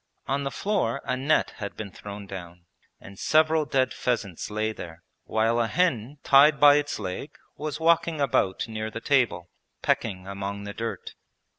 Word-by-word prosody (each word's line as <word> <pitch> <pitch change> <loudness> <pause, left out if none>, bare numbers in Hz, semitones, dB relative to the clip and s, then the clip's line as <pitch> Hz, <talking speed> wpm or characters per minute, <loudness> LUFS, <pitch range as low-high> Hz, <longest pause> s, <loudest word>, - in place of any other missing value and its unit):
On 140 +1 0
the 135 - -1
floor 160 - -1
a 130 - 0
net 140 +4 +1
had 100 -3 -6
been 105 -3 -6
thrown 100 +2 -8
down 90 -3 -9 0.3
and 100 0 -13
several 155 0 +3
dead 130 -2 +1
pheasants 105 -8 -2
lay 110 +1 -1
there, 85 -4 -10 0.2
while 115 +2 +1
a 115 - +2
hen 145 -5 0
tied 140 +2 +6
by 145 0 +8
its 145 0 -1
leg 95 -3 -6 0.2
was 150 +1 -4
walking 165 -1 +2
about 100 -9 +1
near 110 -1 -4
the 110 - -6
table 115 -10 +1 0.3
pecking 95 -5 0
among 100 +1 -5
the 100 0 -6
dirt. 115 +1 -5
115 Hz, 165 wpm, -26 LUFS, 100-145 Hz, 0.3 s, by